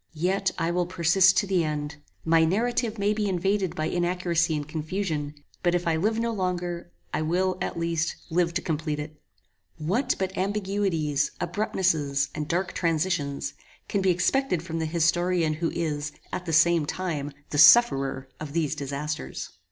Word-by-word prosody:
Yet 190 +4 +1
I 165 +1 0
will 175 0 0
persist 185 +2 +4
to 205 - +3
the 190 -3 +1
end. 150 -1 -3 0.3
My 165 0 +4
narrative 230 +5 0
may 205 +1 +1
be 210 -1 -1
invaded 190 0 0
by 155 - -1
inaccuracy 175 -1 0
and 145 -1 -4
confusion; 155 -2 -3 0.3
but 175 -1 +2
if 175 - -1
I 165 -1 +2
live 215 +7 +1
no 230 0 0
longer, 180 - -3 0.2
I - - 0
will, 180 +4 +1
at - - -3
least, 165 -1 -1 0.2
live 170 0 +2
to 175 - -1
complete 155 -2 -2
it. 150 0 -8 0.6
What 220 - 0
but 190 0 -2
ambiguities, 190 -7 0
abruptnesses, 155 -9 0
and 150 -1 -4
dark 175 +3 -1
transitions, 165 -4 -1 0.3
can 200 - 0
be 190 - +2
expected 185 - +1
from 165 -1 -4
the 160 - -1
historian 170 0 +2
who 165 +2 -1
is, 150 -3 -2 0.2
at 180 - -4
the - - -1
same 165 -1 +4
time, 155 -6 -3 0.2
the 145 - 0
sufferer 140 - +6
of 150 -2 -7
these 155 -3 0
disasters? 145 - -4
170 Hz, 165 wpm, -26 LUFS, 155-185 Hz, 0.6 s, sufferer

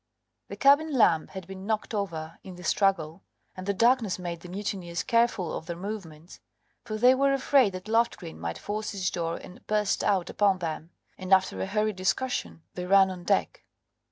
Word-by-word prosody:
The - - -7
cabin 285 +3 +4
lamp 165 -8 +4
had 190 -2 -8
been 190 +1 -9
knocked 220 0 -2
over 165 -6 -4
in 185 - -9
the 180 - -11
struggle, 190 -4 +1 0.3
and 185 +1 -8
the 200 - +1
darkness 230 -2 +3
made 175 -2 -5
the 175 - -11
murderers 185 -3 -4
careful 230 -8 +1
of 160 - -7
their 170 - -4
movements, 175 -5 -8 0.4
for 215 -1 -4
they 250 +3 +6
were 275 +1 +2
afraid 265 -5 +3
that 185 +2 -7
Loftgreen 225 - 0
might 85 0 -4
force 210 +1 -4
his 190 -2 -1
door 170 -1 -2
and 180 - -13
burst 210 -1 +1
out 190 -4 +1
upon 200 -2 +2
them, 165 -2 -5 0.3
and 185 0 -7
after 190 -1 +3
a - - -2
hurried 210 0 0
discussion 190 -2 -2
they 180 0 -5
ran 195 0 +5
on 180 -1 -8
deck. 90 - 0
190 Hz, 185 wpm, -27 LUFS, 175-215 Hz, 0.4 s, they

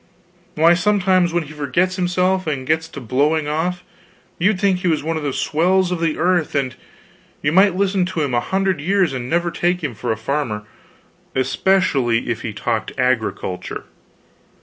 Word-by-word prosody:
Why, 165 +3 +5
sometimes 185 -1 +2
when 175 0 0
he 155 0 -11
forgets 155 +6 0
himself 185 0 0
and 135 -4 -2
gets 160 +3 0
to 140 - -9
blowing 145 +5 +1
off, 175 +4 -2 0.6
you'd 185 +2 +2
think 195 -2 +2
he 180 - -2
was 160 -4 +1
one 165 +1 -1
of 155 - -2
the 145 -1 -2
swells 180 +7 +1
of 180 - -1
the 165 -2 0
earth; 175 -3 +1
and 135 -3 0 0.7
you 145 - +2
might 190 +2 +5
listen 195 -1 +1
to 175 -3 -2
him 140 -3 -2
a 120 - +3
hundred 190 +4 0
years 185 -1 +2
and 125 -1 -4
never 170 +1 +1
take 175 +1 0
him 140 -5 -2
for 115 +2 -3
a 110 - -1
farmer 110 -2 -2 0.7
especially 130 -4 +1
if 115 - -3
he 115 - -4
talked 110 +2 -2
agriculture. 115 -7 -1
160 Hz, 175 wpm, -20 LUFS, 135-180 Hz, 0.7 s, Why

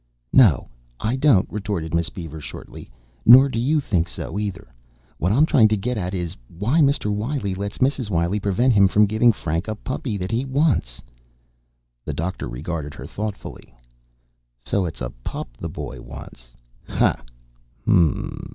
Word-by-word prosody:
"No, 100 - +5 0.3
I 110 +4 0
don't," 130 -8 +4
retorted 100 -6 -3
Miss 85 -1 +1
Beaver 80 -4 -8
shortly. - - -10 0.3
"Nor 130 +4 +8
do 115 - -2
you 145 +6 +2
think 90 - 0
so, 100 - -5
either. 95 -12 -5 0.5
What 90 - +1
I'm 140 +8 +5
trying 120 -8 +5
to 110 0 +1
get 125 +5 -2
at 95 -2 -3
is, 90 -2 -4
why 105 - 0
Mr. 140 -8 +2
Wiley 105 -1 -2
lets 100 +2 -5
Mrs. 130 -4 0
Wiley 85 +2 0
prevent 105 +6 +2
him 100 -2 +6
from 105 +3 +4
giving 110 +3 +4
Frank 85 -3 -3
a 110 - -2
puppy 120 -1 -4
that 95 +2 -4
he 115 +3 0
wants?" 135 - 0 1.0
The - - -4
doctor 85 -5 -3
regarded 75 +4 -5
her - - -8
thoughtfully. 105 - -7 0.8
"So 95 +10 -1
it's 80 -5 -6
a - - -3
pup - - -5
the - - -4
boy - - -7
wants. - - -12 0.3
Ha, - - +1 0.6
hum!" 85 -4 +1
100 Hz, 160 wpm, -22 LUFS, 85-120 Hz, 1.0 s, Nor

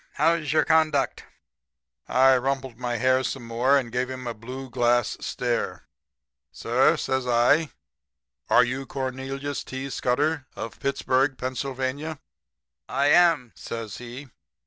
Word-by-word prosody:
'How's 160 -1 +1
your 155 - +3
conduct?' 155 -4 +2 0.8
"I 130 +1 +5
rumpled 130 -2 -2
my 120 -1 -2
hair 130 +2 +3
some 130 -2 -4
more 120 +4 +3
and 125 -4 -2
gave 125 +2 -1
him 130 -1 -6
a 120 - -3
blue 125 +4 -8
glass 120 -2 +1
stare. 120 -1 -2 0.7
"'Sir,' - - +2
says 130 -1 -1
I, 125 +6 +3 0.8
'are 125 - +6
you 130 +3 -3
Cornelius 135 +2 -4
T. 135 +1 -6
Scudder? 145 +4 0
Of 115 - -7
Pittsburg, 135 0 +1
Pennsylvania?' 135 +4 -3 0.7
"'I 140 - +1
am,' 165 -8 +4
says 115 -3 -6
he. 125 +3 -9
130 Hz, 125 wpm, -25 LUFS, 125-140 Hz, 0.8 s, are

